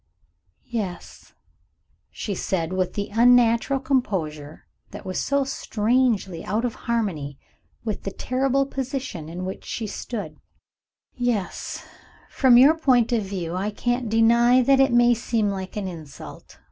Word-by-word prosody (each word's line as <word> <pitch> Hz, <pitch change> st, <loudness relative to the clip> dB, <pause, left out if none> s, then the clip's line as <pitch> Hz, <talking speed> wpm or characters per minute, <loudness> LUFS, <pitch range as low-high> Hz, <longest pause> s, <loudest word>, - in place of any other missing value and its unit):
"Yes," 210 Hz, -7 st, -6 dB, 0.8 s
she 205 Hz, -, -5 dB
said, 180 Hz, -2 st, -2 dB
with 185 Hz, -1 st, -1 dB
the 205 Hz, 0 st, -3 dB
unnatural 240 Hz, +3 st, +4 dB
composure 165 Hz, -, -2 dB, 0.2 s
that -, -, -10 dB
was 185 Hz, -1 st, -3 dB
so 280 Hz, 0 st, +1 dB
strangely 225 Hz, -7 st, 0 dB
out 225 Hz, +4 st, -1 dB
of 240 Hz, -, -2 dB
harmony 185 Hz, -, -3 dB, 0.5 s
with 215 Hz, -3 st, -3 dB
the -, -, -4 dB
terrible 265 Hz, +6 st, 0 dB
position 265 Hz, -, -5 dB
in 180 Hz, +2 st, -5 dB
which 190 Hz, -, -6 dB
she 230 Hz, -, -4 dB
stood 215 Hz, +1 st, -6 dB, 0.7 s
"Yes, 235 Hz, -7 st, -3 dB, 0.5 s
from 255 Hz, -3 st, +5 dB
your 275 Hz, +5 st, +7 dB
point 255 Hz, -7 st, +3 dB
of 235 Hz, -2 st, +2 dB
view, 190 Hz, -4 st, -4 dB
I 195 Hz, +3 st, -1 dB
can't 240 Hz, +2 st, -2 dB
deny 235 Hz, +3 st, +4 dB
that 270 Hz, +2 st, +4 dB
it 270 Hz, -1 st, +4 dB
may 240 Hz, 0 st, +5 dB
seem 225 Hz, -3 st, 0 dB
like 190 Hz, 0 st, -6 dB
an 200 Hz, -2 st, -3 dB
insult. 160 Hz, -5 st, -10 dB
225 Hz, 135 wpm, -24 LUFS, 190-245 Hz, 0.8 s, your